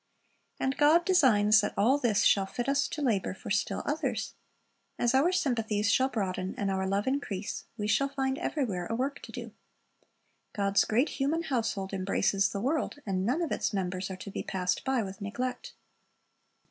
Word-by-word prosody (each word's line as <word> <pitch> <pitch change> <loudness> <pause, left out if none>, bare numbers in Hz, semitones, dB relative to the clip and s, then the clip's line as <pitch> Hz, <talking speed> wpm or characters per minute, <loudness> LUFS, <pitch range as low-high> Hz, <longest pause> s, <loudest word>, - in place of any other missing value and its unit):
And 265 +1 -1
God 315 +4 +5
designs 215 - +5
that 210 - -3
all 255 +8 +4
this 230 -7 +2
shall 195 -1 +4
fit 240 +5 -4
us 280 +1 +2
to 300 - -4
labor 200 -7 0
for - - -8
still 205 - 0
others. 305 +2 -2 0.6
As 240 +1 +1
our 280 +7 +4
sympathies 225 - +1
shall 260 +2 +3
broaden 190 -5 -3
and 200 -1 -1
our 190 0 -1
love 200 +2 0
increase, 220 -8 -3
we 210 - -2
shall 275 +6 +2
find 270 -1 -1
everywhere 200 - -2
a 225 - -2
work 275 +4 -2
to - - -10
do. - - -7 1.0
God's 200 -2 +2
great 245 +8 +2
human 300 +5 -1
household 225 -9 -2
embraces 195 +1 +1
the 200 - -4
world, 285 +4 -1
and 190 -1 -1
none 300 +8 +1
of 325 - -3
its - - -1
members 185 -1 -2
are 190 - -6
to 195 +2 -8
be - - -4
passed 180 -1 -1
by 265 -3 +1
with 195 +1 -8
neglect. 250 - -4
220 Hz, 180 wpm, -29 LUFS, 195-275 Hz, 1.0 s, God